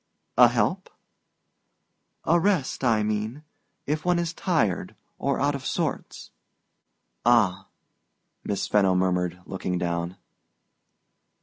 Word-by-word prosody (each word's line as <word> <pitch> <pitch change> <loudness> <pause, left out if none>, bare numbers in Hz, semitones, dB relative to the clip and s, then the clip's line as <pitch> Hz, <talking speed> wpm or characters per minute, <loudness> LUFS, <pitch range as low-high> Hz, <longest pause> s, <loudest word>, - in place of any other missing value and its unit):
"A - - +8
help?" - - 0 1.3
"A 170 +2 +3
rest, 170 -8 0
I 115 -4 +3
mean...if 125 +7 -5
one 180 0 +2
is 170 -1 -1
tired 155 - 0 0.2
or 140 0 0
out 145 +1 +2
of 140 -1 -5
sorts." - - -3 0.9
"Ah," 105 -6 +3 0.8
Miss 100 -1 -2
Fenno 95 -3 +3
murmured, 90 -1 0
looking 90 -1 -3
down. 85 +1 -2
110 Hz, 100 wpm, -25 LUFS, 95-150 Hz, 1.3 s, A